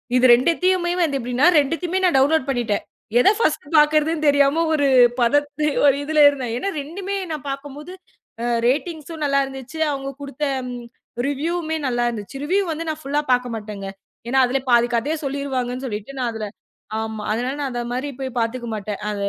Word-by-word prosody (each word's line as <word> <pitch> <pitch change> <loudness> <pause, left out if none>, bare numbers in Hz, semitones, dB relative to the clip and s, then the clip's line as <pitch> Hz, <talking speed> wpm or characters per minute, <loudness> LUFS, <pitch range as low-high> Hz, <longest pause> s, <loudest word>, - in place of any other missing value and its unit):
இது 250 0 +4
2த்தையுமே 345 +7 +2
வந்து 295 -5 +1
எப்படினா? 250 +2 +1
வந்து 330 - +5
2த்தையுமே 340 +6 -2
நான் 350 -5 +3
டவுன்லோ்ட் 280 +1 +3
பண்ணிட்டேன். 240 -5 -1 0.4
எத 250 - +6
ஃபர்ஸ்ட் 310 -8 0
பாக்குறதுன்னு 305 +1 +3
தெரியாம 285 +3 +4
ஒரு 285 -2 +2 0.3
பதட்டு, 290 +4 +1 0.2
ஒரு 275 - +6
இதுல 305 +1 +2
இருந்தேன். 260 -5 -4
ஏன்னா 390 - -2
2மே 380 +7 -5 0.2
நான் 300 -2 -5
பாக்கும்போது 290 +5 -7 0.7
ரேட்டிங்ஸ்சும் 310 +3 -2
நல்லா 275 -1 +2
இருந்துச்சு. 270 +3 -9
அவங்க 275 -1 -4
குடுத்த 280 +1 -6 0.8
ரிவ்யூமே 320 +3 -2
நல்லா 240 -1 0
இருந்துச்சு. 235 +4 -7
ரிவ்யூ 385 +6 +2
வந்து 320 +1 -4
நான் 310 0 -4
ஃபுல்லா 290 +2 0
பாக்கமாட்டங்க. 220 -5 -3 0.4
ஏன்னா 265 +2 +2
அதுல 270 +2 0
பாதி 240 0 +5
கதை 240 +7 0
சொல்லிருவாங்கன்னு 265 -2 -3
சொல்லிட்டு 220 +5 -6
நான் 240 -2 0
அதுல 215 -1 -4 0.5
ஆமா 220 -1 -4
அதனால 245 +5 -1
நான் 280 -2 -2
அந்த 240 0 -3
மாரிப் 260 +1 -4
போய்பாத்துக்க 245 -2 -2
மாட்டேன் 210 -1 -4
அத. 210 - -2
275 Hz, 160 wpm, -21 LUFS, 245-305 Hz, 0.8 s, எத